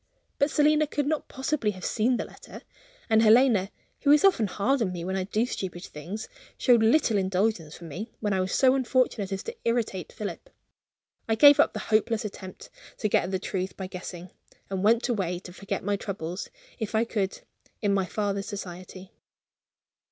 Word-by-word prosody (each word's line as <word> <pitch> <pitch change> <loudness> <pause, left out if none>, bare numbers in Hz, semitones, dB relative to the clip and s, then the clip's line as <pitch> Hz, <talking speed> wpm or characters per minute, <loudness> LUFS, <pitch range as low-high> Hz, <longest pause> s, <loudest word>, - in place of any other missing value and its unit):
But 280 - +3
Selina 300 +1 +3
could 290 0 -1
not 310 +1 -1
possibly 265 -3 -1
have 185 -3 -5
seen 240 +3 +1
the - - -3
letter - - -12 0.4
and 220 -1 +4
Helena 220 -3 +5 0.3
(who 285 - +1
is 300 +6 +6
often 295 - +4
hard 240 +8 0
on 195 -5 0
me 175 -2 -5
when 190 +1 -2
I 190 -1 -1
do 215 +4 0
stupid 185 -7 -5
things) 185 +9 -7 0.3
showed 245 -3 +4
little 225 -2 +3
indulgence 190 -4 -1
for - - -13
me, 180 +8 -7
when 210 -2 -1
I 190 - +1
was 185 0 -1
so 260 -1 +4
unfortunate 255 -6 +1
as 195 - -3
to 460 - -6
irritate 230 -6 -1
Philip. 215 - -6 0.8
I 225 - +3
gave 285 +5 +8
up - - +4
the - - -4 0.2
hopeless 220 0 +2
attempt 190 -2 -9 0.3
to 215 - -1
get - - +2
at - - -5
the 190 - 0
truth 185 0 -4
by 190 - -4
guessing, 180 -1 -8 0.4
and 190 0 -2
went 230 +4 +3
away 190 -7 -1
to 180 0 -11
forget 195 +1 -4
my 200 +1 0
troubles, 185 -3 -5 0.3
if 220 -1 -3
I 220 +2 +3
could, 200 -4 -2 0.4
in 205 -1 +2
my 195 -1 +1
father's 200 -1 -2
society. 185 -1 -8
210 Hz, 190 wpm, -27 LUFS, 190-240 Hz, 0.8 s, gave